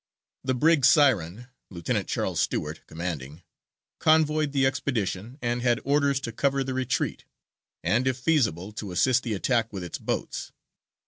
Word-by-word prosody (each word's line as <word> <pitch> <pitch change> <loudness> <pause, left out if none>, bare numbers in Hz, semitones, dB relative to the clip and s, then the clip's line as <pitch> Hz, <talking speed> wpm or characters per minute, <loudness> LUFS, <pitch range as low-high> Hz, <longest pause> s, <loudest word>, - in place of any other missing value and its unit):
The 130 -1 0
brig 155 +2 +3
Siren, 125 - +4 0.2
Lieutenant 85 -4 -2
Charles - - -1
Stewart, 75 +1 -1
commanding, 80 -2 -6 0.6
convoyed 155 -1 +3
the 135 -1 +2
expedition, 125 -4 -2
and 120 0 0
had 120 -1 +2
orders 140 -1 +2
to 115 - -4
cover 140 +3 0
the 130 0 -4
retreat, 130 +1 -2 0.6
and 110 +10 +2
if 130 -1 +1
feasible 115 - +1
to 105 -2 -6
assist 120 +9 +3
the 115 -4 -2
attack 115 +2 0
with 95 -3 -5
its 85 - -6
boats. - - -3
125 Hz, 145 wpm, -26 LUFS, 95-135 Hz, 0.6 s, Siren